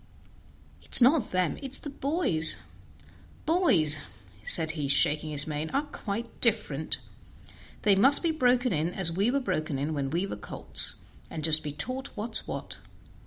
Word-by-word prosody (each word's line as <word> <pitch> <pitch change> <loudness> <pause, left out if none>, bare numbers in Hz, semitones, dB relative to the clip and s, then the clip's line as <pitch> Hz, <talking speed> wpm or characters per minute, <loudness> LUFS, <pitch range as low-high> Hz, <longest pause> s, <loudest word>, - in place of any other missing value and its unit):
It - - -5
is - - +16
not 260 -2 +2
them, 185 -2 -2
it 270 -2 -9
is - - +4
the 290 - -8
boys; 275 - -2 0.9
boys," 240 - +3 0.4
said 160 +8 +3
he, 150 -3 -5
shaking 150 +3 +1
his 145 -1 +1
mane, 155 0 -5
"are 280 - 0
quite 230 -5 -8
different; 200 - 0 0.9
they 205 - +3
must 265 - +5
be 335 - 0
broken 250 -5 0
in 165 +3 -3
as 180 -4 +1
we 195 +7 -1
were 280 +3 0
broken 155 - -4
in 145 +4 -4
when 140 -2 -4
we 170 +6 -2
were - - -7
colts, - - -3 0.3
and 155 - -7
just 155 0 +8
be 150 - -5
taught 255 - -4
what's 220 +1 -4
what. - - -8
185 Hz, 165 wpm, -26 LUFS, 155-255 Hz, 0.9 s, is